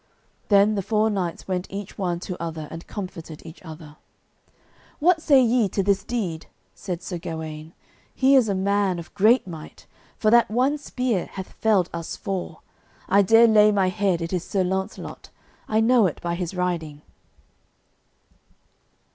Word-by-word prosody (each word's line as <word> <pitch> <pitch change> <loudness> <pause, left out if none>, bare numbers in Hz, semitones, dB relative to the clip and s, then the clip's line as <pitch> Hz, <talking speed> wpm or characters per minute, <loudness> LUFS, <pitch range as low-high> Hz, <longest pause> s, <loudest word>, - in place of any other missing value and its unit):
Then 205 +1 +5
the 200 - -1
four 215 +2 +1
knights 180 -4 -3
went 185 -1 -2
each 200 0 -7
one 175 -3 -2
to 180 - -5
other 160 -2 -5
and 165 +1 -9
comforted 165 -6 -8
each 160 +1 -11
other. 155 -3 -11 1.0
"What 330 +1 +3
say 285 -4 +5
ye 235 -3 +2
to 195 - -1
this 195 0 +1
deed?" 190 -9 -4 0.3
said 180 -3 -6
Sir 180 -2 -5
Gawaine. 160 -1 -7 0.4
"He 265 +1 +4
is 245 -5 +4
a 200 - 0
man 195 -1 +1
of 170 0 -9
great 220 +5 +4
might, 160 -4 -10 0.3
for 215 - +2
that 235 0 +5
one 260 +7 +1
spear 250 -9 -2
hath 190 -1 -7
felled 205 -6 +1
us 170 -1 -5
four. 190 -5 -5 0.5
I 200 +2 +5
dare 225 +4 +6
lay 215 -1 +6
my 195 -3 +2
head 190 -3 0
it 165 - -5
is 180 -2 -1
Sir 190 0 -1
Launcelot; 190 +1 -4 0.4
I 215 - +1
know 230 -2 +4
it 165 - -5
by 170 0 -3
his 175 +1 -4
riding." 165 -5 -3
190 Hz, 165 wpm, -24 LUFS, 170-215 Hz, 1.0 s, dare